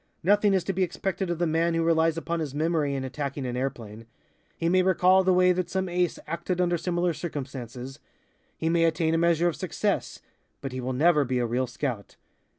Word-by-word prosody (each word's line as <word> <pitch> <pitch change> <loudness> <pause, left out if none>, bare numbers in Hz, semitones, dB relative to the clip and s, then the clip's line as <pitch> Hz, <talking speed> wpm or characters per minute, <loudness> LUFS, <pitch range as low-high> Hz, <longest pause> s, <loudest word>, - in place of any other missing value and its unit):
Nothing 205 +2 +4
is 185 - +1
to 195 - -2
be 190 - -2
expected 185 +1 -2
of 175 - -1
the 175 - +1
man 165 +1 +1
who 165 - +1
relies 165 0 +2
upon 165 0 -2
his 145 -4 -4
memory 155 -2 0
in 135 - -3
attacking 140 +1 -4
an 125 -1 -3
airplane. 115 -4 -5 0.5
He 165 - -1
may 185 +2 +4
recall 185 +1 +4
the 185 - +3
way 180 0 +5
that 180 -1 -1
some 190 0 -1
Ace 175 -1 0
acted 170 +3 -3
under 175 -1 +2
similar 175 0 0
circumstances. 135 -4 -6 0.6
He 160 - -2
may 165 0 +3
attain 160 0 +1
a 165 - +2
measure 170 0 +3
of 170 - -1
success, - - -2 0.4
but 135 - -5
he 130 0 -5
will 130 +1 -3
never 150 +3 +4
be 130 -1 -1
a 120 - +1
real 125 +2 -1
scout. 120 -4 -4
165 Hz, 210 wpm, -26 LUFS, 135-175 Hz, 0.6 s, way